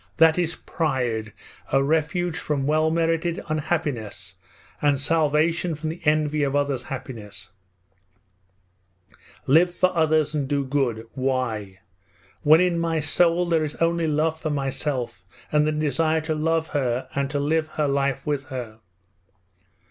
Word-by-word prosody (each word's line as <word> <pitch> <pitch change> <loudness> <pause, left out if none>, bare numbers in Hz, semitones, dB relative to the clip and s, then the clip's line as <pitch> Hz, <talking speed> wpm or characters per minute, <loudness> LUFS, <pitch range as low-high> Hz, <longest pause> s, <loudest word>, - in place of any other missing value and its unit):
That 160 +1 +5
is 170 -1 0
pride, 125 -9 -2 0.4
a 135 0 +3
refuge 160 +3 0
from 145 -4 -2
well 155 +2 +2
merited 165 +1 0
unhappiness, 145 - -3 0.5
and 145 -2 +2
salvation 160 +2 +1
from 155 +1 -4
the 165 +2 -6
envy 150 0 +2
of 140 -1 0
others' 140 -2 0
happiness: 110 -8 -8 1.9
"Live 165 +6 +5
for 185 +1 +1
others, 155 -2 +2
and 145 -3 -1
do 140 -1 0
good!" 130 -5 -1
Why? 120 -8 -2 0.6
when 155 +3 +6
in 180 -2 +2
my 165 -1 0
soul 170 +3 +3
there 165 -2 +1
is 150 -1 -4
only 165 0 +1
love 155 +1 0
for 155 - -2
myself 135 -6 -2 0.3
and 150 0 +3
the - - +2
desire 155 +1 +1
to 160 0 -2
love 160 +1 0
her 130 -4 -1
and 140 -1 -1
to 145 0 -1
live 155 +2 +1
her 155 -1 -1
life 140 -1 0
with 145 -2 -1
her? 125 -5 -7
150 Hz, 140 wpm, -24 LUFS, 135-160 Hz, 1.9 s, when